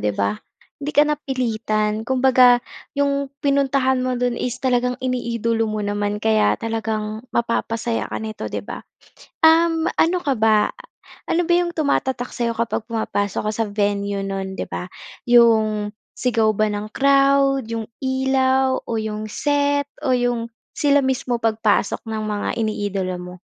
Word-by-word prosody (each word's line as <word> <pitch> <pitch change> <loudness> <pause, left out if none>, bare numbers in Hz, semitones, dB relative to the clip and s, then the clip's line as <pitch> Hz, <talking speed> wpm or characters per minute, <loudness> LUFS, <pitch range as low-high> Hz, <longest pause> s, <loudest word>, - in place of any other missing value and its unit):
'di 105 -1 -1
ba? 100 +1 -1 0.4
'Di 285 - -4
ka 295 - +7
napilitan, 225 -7 -1
kumbaga 255 0 +4 0.3
yung 280 -1 0 0.2
pinuntahan 275 -2 +2
mo 255 0 -1
do'n 245 0 -1
is 250 -1 -2
talagang 250 -1 0
iniidolo 230 -3 -1
mo 215 -1 -3
naman 205 0 -1
kaya 215 0 +2
talagang 220 -1 -3
mapapasaya 230 0 -1
ka - - -4
nito 220 0 -5
'di - - -5
ba? - - -7 0.6
Um, 325 0 +4
ano 350 +2 +2
ka 275 -5 0
ba, 215 -1 +3 0.6
ano 340 0 +1
ba 345 - +3
yung 350 0 +1
tumatatak 265 -5 -1
sa'yo 235 -1 0
kapag 230 -1 -2
pumapasok 205 -3 -1
ka - - +1
sa 225 - 0
venue 200 -1 -1
no'n 195 -1 -4
'di - - -3
ba, 180 +1 -6 0.3
yung 220 -3 +3 0.2
sigaw 230 -3 +1
ba 215 +1 +1
ng 210 0 -4
crowd, 275 -2 +3
yung 225 -1 -3 0.2
ilaw 265 0 +1
o 225 - -2
yung 215 0 -4
set 285 +1 +1 0.2
o 270 - +1
yung 245 -2 0 0.2
sila 285 -1 +3
mismo 260 -3 -1
pagpasok 220 -2 +1
ng 220 -1 -4
mga 210 -1 -2
iniidolo 205 -4 -2
mo? 180 0 -8
230 Hz, 150 wpm, -21 LUFS, 215-265 Hz, 0.6 s, ka